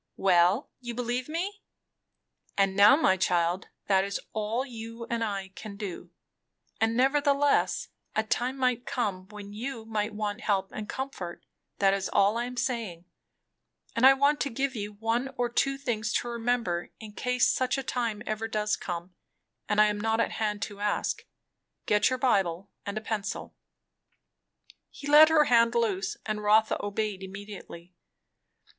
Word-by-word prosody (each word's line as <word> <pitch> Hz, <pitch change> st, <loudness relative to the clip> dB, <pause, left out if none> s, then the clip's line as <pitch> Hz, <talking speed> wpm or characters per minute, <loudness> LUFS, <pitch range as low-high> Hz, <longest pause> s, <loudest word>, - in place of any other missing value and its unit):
"Well, 185 Hz, +5 st, +3 dB
you 240 Hz, -2 st, -6 dB
believe 245 Hz, +2 st, -2 dB
me? 385 Hz, +6 st, -3 dB, 1.0 s
And 195 Hz, -1 st, +2 dB
now, 205 Hz, +5 st, +8 dB
my 190 Hz, -11 st, +3 dB
child, 175 Hz, 0 st, +1 dB, 0.2 s
that 190 Hz, -1 st, +3 dB
is 200 Hz, 0 st, -3 dB
all 220 Hz, +4 st, -1 dB
you 230 Hz, -2 st, -8 dB
and 230 Hz, -1 st, 0 dB
I 200 Hz, -3 st, -3 dB
can 200 Hz, +1 st, -9 dB
do. 185 Hz, -4 st, -6 dB, 0.7 s
And 225 Hz, +1 st, +1 dB
nevertheless, 285 Hz, +2 st, +2 dB, 0.3 s
a 220 Hz, -, +2 dB
time 245 Hz, +4 st, -1 dB
might 250 Hz, -2 st, 0 dB
come 195 Hz, -6 st, -2 dB
when 205 Hz, -1 st, -10 dB
you 230 Hz, +1 st, -5 dB
might 210 Hz, -1 st, -2 dB
want 210 Hz, -1 st, -3 dB
help 195 Hz, -2 st, 0 dB
and 215 Hz, -1 st, -6 dB
comfort, 225 Hz, -10 st, -5 dB, 0.3 s
that 195 Hz, -1 st, +4 dB
is 195 Hz, -1 st, -1 dB
all 200 Hz, +2 st, +4 dB
I 235 Hz, +1 st, -1 dB
am 250 Hz, 0 st, -7 dB
saying; 225 Hz, -9 st, -2 dB, 0.9 s
and 230 Hz, -, 0 dB
I 265 Hz, +1 st, +10 dB
want 285 Hz, +2 st, +2 dB
to 280 Hz, -, 0 dB
give 270 Hz, +2 st, -2 dB
you 210 Hz, -1 st, -4 dB
one 225 Hz, +5 st, -1 dB
or 245 Hz, -1 st, 0 dB
two 275 Hz, +3 st, +1 dB
things 220 Hz, -6 st, -2 dB
to 240 Hz, -, 0 dB
remember 230 Hz, -7 st, -1 dB
in 220 Hz, -1 st, -9 dB
case 250 Hz, +1 st, +2 dB
such 255 Hz, +1 st, 0 dB
a 270 Hz, -, -3 dB
time 230 Hz, -4 st, -2 dB
ever 215 Hz, +1 st, -2 dB
does 210 Hz, -1 st, 0 dB
come, 175 Hz, 0 st, -6 dB, 0.6 s
and 210 Hz, 0 st, +2 dB
I 215 Hz, -, +8 dB
am 210 Hz, -1 st, 0 dB
not 225 Hz, +1 st, +1 dB
at -, -, +1 dB
hand 210 Hz, -2 st, -2 dB
to 205 Hz, -1 st, -6 dB
ask. 210 Hz, 0 st, -1 dB, 0.6 s
Get 210 Hz, 0 st, +3 dB
your 255 Hz, -, -1 dB
Bible, 195 Hz, -8 st, +1 dB, 0.2 s
and 200 Hz, +1 st, -3 dB
a -, -, -2 dB
pencil." 215 Hz, -2 st, -4 dB, 1.3 s
He 280 Hz, -, -11 dB
let 300 Hz, +2 st, +8 dB
her 315 Hz, -1 st, +5 dB
hand 235 Hz, -3 st, +4 dB
loose, 200 Hz, -5 st, 0 dB
and 215 Hz, -1 st, -2 dB
Rotha 215 Hz, +1 st, +3 dB
obeyed 205 Hz, -1 st, -2 dB
immediately. 190 Hz, -3 st, -9 dB
220 Hz, 165 wpm, -28 LUFS, 200-245 Hz, 1.3 s, I